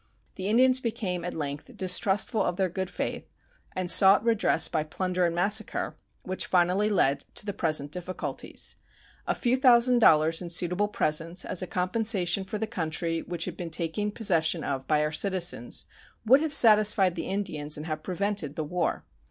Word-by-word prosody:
The 190 0 -5
Indians 255 +4 +4
became 195 -7 -3
at 175 - -5
length 145 -2 -6
distrustful 190 +4 +1
of 180 - -1
their 190 0 0
good 190 +1 -4
faith - - -5 0.5
and 185 -1 -1
sought 195 +3 +6
redress 225 -2 +2
by 155 - -1
plunder 180 +3 -1
and 170 - -3
massacre, 210 +5 0 0.3
which 185 0 -3
finally 185 +4 +2
led 140 -9 +1
to - - -3
the 205 - -3
present 155 -5 -1
difficulties. 180 +2 -4 0.5
A - - 0
few 245 0 +1
thousand 250 -2 +4
dollars 160 -5 +4
in 175 - -6
suitable 180 +4 -1
presents, 165 -2 -1
as 185 - -1
a 185 - -4
compensation 190 +1 +1
for 215 +2 -5
the 220 - -2
country 165 -4 -3
which 170 -2 -4
had 180 - -6
been 175 -1 -6
taken 170 +6 -3
possession 170 -7 0
of 135 -1 -4
by 150 -1 +2
our 150 - -1
citizens, 175 - -1 0.4
would 265 +6 +5
have 315 -1 -2
satisfied 215 - +5
the 175 - -5
Indians 155 -7 -2
and 150 - -7
have 155 -1 -4
prevented 185 -4 -3
the 155 - -3
war. 170 +3 -2
180 Hz, 175 wpm, -27 LUFS, 165-210 Hz, 0.5 s, sought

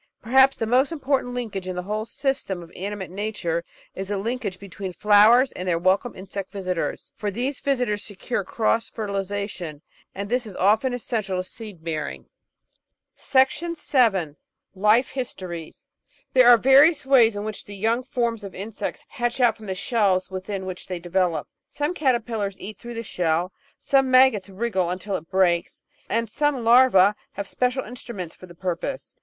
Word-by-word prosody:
Perhaps 265 +4 +4
the 225 - -1
most 255 +6 +3
important 270 -5 -1
linkage 205 -6 -4
in 185 - -3
the 180 - -3
whole 210 +3 -3
system 260 -8 -2
of 165 - -14
animate 195 -1 -5
nature 185 -4 -2 0.3
is 190 0 -5
the 205 0 -2
linkage 220 -2 -3
between 195 -1 -7
flowers 215 +7 +5
and 180 - -6
their 170 -2 +2
welcome 190 +7 +1
insect 190 +1 -7
visitors. 185 -3 -3
For 210 - -3
these 250 +7 -2
visitors 250 -7 0
secure 205 +1 -3
cross 225 +3 0
fertilisa 200 -2 -3
tion, 160 -7 -8 0.3
and 200 +1 -4
this 245 +1 -1
is 200 - -9
often 215 +7 +3
essential 215 -6 -2
to 185 - -1
seed 205 -8 -10
bearing. 160 -2 -4 2.5
Life 210 +6 +3
histories 185 - -6 0.5
There 255 -2 +6
are 240 - +9
various 275 +5 +5
ways 240 -5 +5
in 205 - -3
which 215 -1 -6
the 205 - -9
young 225 +5 +1
forms 235 -4 -2
of 195 - -8
Insects 205 +3 -5
hatch 240 +1 -2
out 240 -3 +4
from 215 - -12
the 190 - -2
shells 190 -3 +1
within 190 +1 -4
which 185 -1 -7
they 185 - -3
develop. 175 -1 0 0.2
Some 295 +4 -2
caterpillars 235 - -1
eat 210 +2 -8
through 240 0 -8
the 230 - -4
shell; 175 -2 -1 0.2
some 270 -1 +2
maggots 255 -6 +5
wriggle 190 -2 -1
imtil 185 +3 -3
it 165 - -22
breaks; 180 -3 +1 0.3
and 230 +1 0
some 280 +2 0
larvae 230 -5 +6 0.2
have 200 -1 -5
special 250 +4 0
instruments 215 -7 -7
for 185 - -13
the 175 - -14
purpose. 180 +8 -4
210 Hz, 165 wpm, -24 LUFS, 185-245 Hz, 2.5 s, are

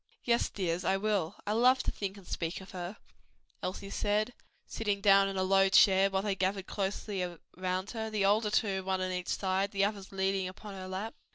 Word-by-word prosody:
"Yes, 235 -1 +2
dears, 180 -2 -2
I 190 - +2
will: 200 -4 0
I 205 - -1
love 250 +4 +4
to - - -1
think 200 -1 -5
and 195 - -13
speak 165 0 -3
of 190 0 -12
her," 180 +2 -6 0.6
Elsie 195 +2 -5
said, 210 +4 0 0.3
sitting 205 -3 -2
down 195 -1 +6
in 195 0 -3
a 190 - +1
low 195 0 +4
chair 195 0 +6
while 190 0 -1
they 205 -1 0
gathered 190 0 -1
closely 195 -1 -2 0.3
round 185 +2 -2
her, 220 -2 -3
the 210 -2 0
older 210 +2 +3
two, 195 -3 +1
one 190 0 -1
on 185 0 -1
each 180 0 -3
side, 190 +1 0
the 195 0 +2
others 200 -2 -4
leaning 190 -1 0
upon 200 +2 -9
her 185 -1 -7
lap. 190 +4 -4
195 Hz, 205 wpm, -31 LUFS, 190-205 Hz, 0.6 s, down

